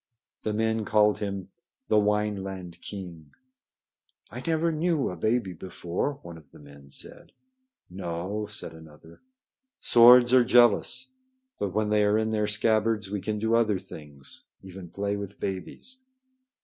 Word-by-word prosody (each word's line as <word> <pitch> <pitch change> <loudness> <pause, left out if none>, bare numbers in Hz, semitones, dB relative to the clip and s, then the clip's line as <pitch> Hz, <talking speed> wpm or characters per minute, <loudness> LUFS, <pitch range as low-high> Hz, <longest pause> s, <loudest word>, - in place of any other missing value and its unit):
The 110 - -2
men 110 +1 0
called 105 0 +3
him 100 -2 -4 0.4
the 110 - +3
"Wineland 95 -4 -2
king." 85 -7 -9 1.0
"I 120 +3 -7
never 165 +1 +1
knew 160 - 0
a - - -6
baby 110 +1 0
before," 90 - -4
one 85 -1 -10
of 75 - -22
the - - -17
men 70 -1 -15
said. - - -8 0.5
"No," 90 +3 -4
said 105 -5 -3
another. 80 0 -15 0.6
"Swords 120 +1 +7
are 130 -1 +7
jealous. 120 - +3 0.5
But 100 -2 -3
when 110 -1 +1
they 105 0 +3
are 105 +1 +3
in 110 0 0
their 105 -1 0
scabbards, 110 -1 +1
we 105 -2 -3
can 105 +1 -2
do 110 +2 0
other 110 -4 +3
things, 75 -7 -10 0.2
even 95 -2 -10
play 100 +2 -2
with 100 0 -8
babies." 95 - -6
105 Hz, 145 wpm, -27 LUFS, 90-110 Hz, 1.0 s, Swords